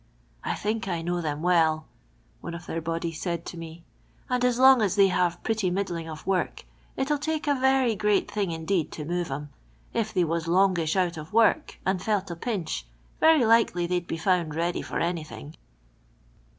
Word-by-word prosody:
" - - -36
I - - -1
think 215 0 -2
I 170 -3 -2
know 175 +1 -1
them 150 -1 -3
well," 160 -3 +3 0.5
one 170 - -6
of 170 0 -9
their 165 - -3
body 165 +1 -2
said 170 +1 -4
to - - -7
me, 165 0 -9 0.2
*' - - -33
and 250 0 +1
as 250 -1 +2
long 260 -1 +7
as 200 -4 +1
they 200 -2 +5
have 180 -1 0
pretty 220 -4 0
middling 175 -3 -3
of 155 -1 -8
work, 190 -1 -1 0.4
it 270 +2 -1
'11 295 - +1
take 310 +1 -2
a 290 - +4
very 265 -2 +3
great 210 0 +1
thing 205 -3 -1
indeed 165 +1 -1
to 150 - -6
move 175 0 -2
'em. 145 +2 -5 0.4
If 220 -1 -1
they 185 -4 +2
was 165 0 -1
longish 175 -2 +2
out 180 -3 +1
of 155 +3 -9
work 230 +7 +3
and 190 -1 0
felt 200 -3 -1
a - - -4
pinch, 170 - -3 0.3
very 315 -6 +5
likely 225 -6 +3
they'd 175 0 -1
be 165 - -3
found 170 -3 +1
ready 170 +2 -1
for - - -5
anything." 160 -2 -4
180 Hz, 200 wpm, -26 LUFS, 165-215 Hz, 0.5 s, long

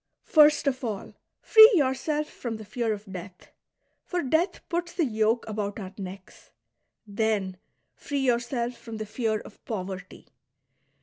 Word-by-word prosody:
First 300 -1 +5
of 265 -1 0
all, 215 -5 -4 0.3
free 440 +1 +9
yourself 295 +1 +1
from 235 -6 -6
the 215 - -10
fear 225 +2 -2
of 210 0 -4
death, 180 0 -10 0.5
for 360 -1 -2
death 320 +8 0
puts 345 0 -2
the 335 - +1
yoke 220 -1 +1
about 210 -1 -3
our 190 -2 -7
necks; 190 -1 -10 0.6
then 205 -3 -1 0.4
free 285 -1 -3
yourself 240 -1 -1
fx'om 230 -2 -7
the 215 - -4
fear 220 0 -1
of 210 - -15
poverty. 190 -4 -6
225 Hz, 140 wpm, -27 LUFS, 205-275 Hz, 0.6 s, free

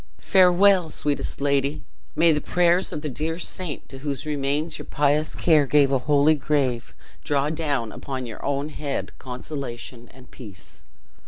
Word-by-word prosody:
"Farewell, 185 -1 +4
sweetest 145 -2 -2
lady! 140 +1 0 0.3
May 165 +1 +5
the 150 -1 0
prayers 175 +3 +2
of 150 - -5
the - - -2
dear 155 +4 -3
saint, 175 -3 -2
to 135 - -10
whose 140 -1 -4
remains 145 +2 -2
your - - -9
pious 150 +1 +1
care 155 -4 +3
gave 140 -1 +4
a 135 - +2
holy 145 +3 +3
grave, 135 -5 -1 0.3
draw 145 +1 0
down 145 -8 -2
upon 130 -2 -6
your 115 -2 -9
own 140 +1 -1
head 145 -2 -4
consolation 125 -2 -7
and 130 -1 -17
peace!" 100 -7 -11
145 Hz, 155 wpm, -24 LUFS, 135-155 Hz, 0.3 s, May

